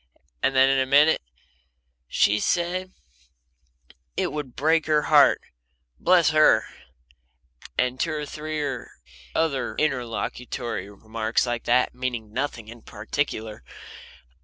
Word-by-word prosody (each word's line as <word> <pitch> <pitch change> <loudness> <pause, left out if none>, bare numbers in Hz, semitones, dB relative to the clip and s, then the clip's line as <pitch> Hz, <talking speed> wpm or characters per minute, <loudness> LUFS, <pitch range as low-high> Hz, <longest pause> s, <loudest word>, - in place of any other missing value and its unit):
And 135 - +1
then, 130 0 +6
in 135 0 +3
a 130 - +1
minute: 145 +4 +5 0.9
"She 105 +10 +2
said 180 - -1 1.3
it - - 0
would 145 -5 -6
break 160 +2 +2
her 150 -1 +3
heart - - +5 0.6
bless 175 -4 +4
her!" 155 0 +5 1.1
And 125 0 0
two 165 -2 0
or 150 -1 -3
three 155 +1 -4 0.7
other 140 -7 0
interlocutory 120 -5 -3
remarks 110 +3 -2
like 120 -1 -3
that, 125 +1 +2
meaning 120 -4 -4
nothing 125 -4 -3
in 115 +1 -11
particular. 110 - -4
130 Hz, 110 wpm, -24 LUFS, 115-155 Hz, 1.3 s, then